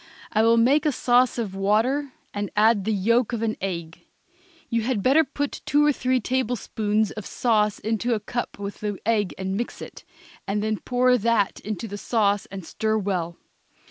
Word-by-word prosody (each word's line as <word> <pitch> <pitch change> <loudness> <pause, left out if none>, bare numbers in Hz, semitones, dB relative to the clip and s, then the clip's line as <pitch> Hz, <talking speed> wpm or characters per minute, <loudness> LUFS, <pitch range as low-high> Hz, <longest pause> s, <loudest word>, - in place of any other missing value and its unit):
I 215 - +2
will 230 +1 +4
make 275 +7 +4
a - - +3
sauce 250 -1 +2
of 220 -5 -3
water 225 +9 +1 0.2
and 205 0 -3
add 210 -1 +4
the 220 - +1
yolk 230 +4 +2
of 230 -1 -2
an 220 -1 0
egg. 170 -3 -5 0.6
You 230 0 0
had 225 -3 -1
better 285 +5 +5
put 290 -2 -4
two 295 +1 +4
or 295 - +5
three 255 -2 0
tablespoons 220 -4 -1
of 215 - -7
sauce 210 -3 +1
into 225 +2 -1
a - - -2
cup 240 +3 -4
with 200 0 -6
the 205 -2 -3
egg 210 -4 +1
and 190 0 -3
mix 235 +4 -4
it, - - -10 0.4
and 205 +1 -1
then 215 -1 -1
pour 250 0 +2
that 220 -2 +1
into 215 +1 -5
the 205 0 -7
sauce 205 -2 +1
and 190 -2 -8
stir 220 +5 -1
it - - -1
well. 175 -4 -2
220 Hz, 190 wpm, -24 LUFS, 205-245 Hz, 0.6 s, better